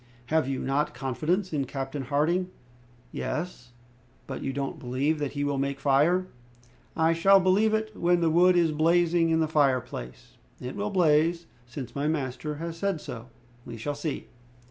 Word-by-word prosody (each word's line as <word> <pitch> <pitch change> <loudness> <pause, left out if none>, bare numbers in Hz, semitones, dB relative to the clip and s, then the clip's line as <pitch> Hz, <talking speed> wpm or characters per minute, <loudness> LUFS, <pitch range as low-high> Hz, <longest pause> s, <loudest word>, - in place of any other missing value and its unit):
"Have 160 -4 +3
you 135 - -1
not 150 +3 0
confidence 160 - -1
in 140 -3 0
Captain 135 +1 -4
Harding?" 155 +7 0 0.6
"Yes." 155 -7 -4 0.6
"But 130 - -6
you 135 - -2
don't 135 0 -4
believe 135 +5 -1
that 145 -2 -3
he 145 0 -2
will 145 -1 -1
make 140 0 -2
fire?" 150 +7 +3 0.7
"I 160 +1 +3
shall 195 +4 +5
believe 200 +4 +3
it 220 -1 -3
when 175 0 +2
the 165 -1 +2
wood 180 +2 +5
is 170 -2 +3
blazing 165 +2 +3
in 160 0 +2
the 160 - +2
fireplace." 130 - -1 0.2
"It 125 +1 -6
will 205 +1 -2
blaze, 170 -2 +2 0.2
since 120 -1 -8
my 140 +1 -1
master 150 0 -2
has 165 +2 -6
said 195 -2 -1
so." 115 -4 -8 0.4
"We 115 - -8
shall 145 +7 -3
see!" 145 +1 -4
150 Hz, 165 wpm, -27 LUFS, 135-170 Hz, 0.7 s, shall